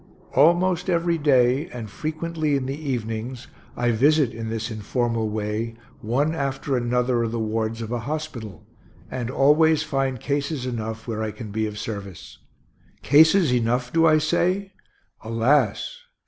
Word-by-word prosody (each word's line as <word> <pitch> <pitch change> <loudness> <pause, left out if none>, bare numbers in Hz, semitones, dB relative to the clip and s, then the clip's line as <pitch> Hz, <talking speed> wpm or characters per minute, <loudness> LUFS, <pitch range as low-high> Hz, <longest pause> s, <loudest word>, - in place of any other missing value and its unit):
Almost 175 +5 +3
every 170 -1 +1
day, 135 0 +3
and 120 -3 -7
frequently 155 +4 -2
in 135 -2 -1
the 135 - -2 0.2
evenings, 120 +1 -4 0.3
I 120 -1 +2
visit, 140 +3 +3
in 115 0 -5
this 115 +1 -3
informal 115 +1 -1
way, 110 +2 -3 0.2
one 135 +8 0
after 140 -2 -2
another 125 0 +1
of 115 -1 -1
the 115 - -2
wards 110 +1 -2
of 110 - -6
a 120 - -1
hospital, 120 - -6 0.5
and 125 -2 -3
always 155 +4 +4
find 135 -4 -1
cases 140 0 -2
enough 110 -2 -4
where 110 -2 -3
I 110 - -1
can 105 -1 -8
be 110 +1 -1
of 105 0 -7
service. 100 -4 -7 0.6
Cases 160 +1 +5
enough, 125 +1 0
do 165 0 +5
I 155 -1 +5
say? 180 +5 0 0.5
Alas! 120 - +1
125 Hz, 150 wpm, -24 LUFS, 115-155 Hz, 0.6 s, Cases